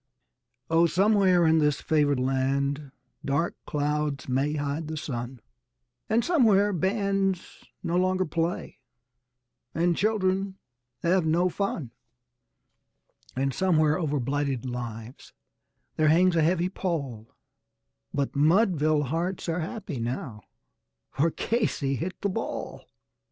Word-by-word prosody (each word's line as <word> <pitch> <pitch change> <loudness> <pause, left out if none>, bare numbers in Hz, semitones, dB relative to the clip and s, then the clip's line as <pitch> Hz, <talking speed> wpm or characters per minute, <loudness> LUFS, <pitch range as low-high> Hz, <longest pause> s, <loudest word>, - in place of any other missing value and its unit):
Oh, 165 +1 +4
somewhere 190 0 +4
in 160 0 +4
this 150 -1 +2
favored 145 -3 +2
land 135 +2 0 0.3
dark 145 +5 0
clouds 150 -1 -1
may 135 +3 0
hide 145 +2 -2
the 155 0 -4
sun, 120 -3 -5 0.7
And 225 +2 +2
somewhere 210 - +4
bands 195 0 -1 0.2
no 175 0 0
longer 185 +1 +2
play 165 +2 -3 1.0
and 170 +1 +2
children 195 -1 0 0.5
have 180 +1 +3
no 170 +3 +2
fun; 175 - -3 1.4
And 135 +1 0
somewhere 155 -2 +2
over 150 -4 0
blighted 135 0 -1
lives 120 -1 -7 0.6
there 155 - +3
hangs 175 +3 +4
a 165 - +3
heavy 175 +2 +2
pall, 140 - -4 0.8
But 140 0 -2
Mudville 155 -1 +3
hearts 170 +7 -2
are 165 +1 -1
happy 175 - -5
now 115 -2 -4 0.7
for 155 +5 +2
Casey 165 - -1
hit 180 +6 -4
the 200 - 0
ball! 185 - -5
160 Hz, 115 wpm, -27 LUFS, 140-185 Hz, 1.4 s, Oh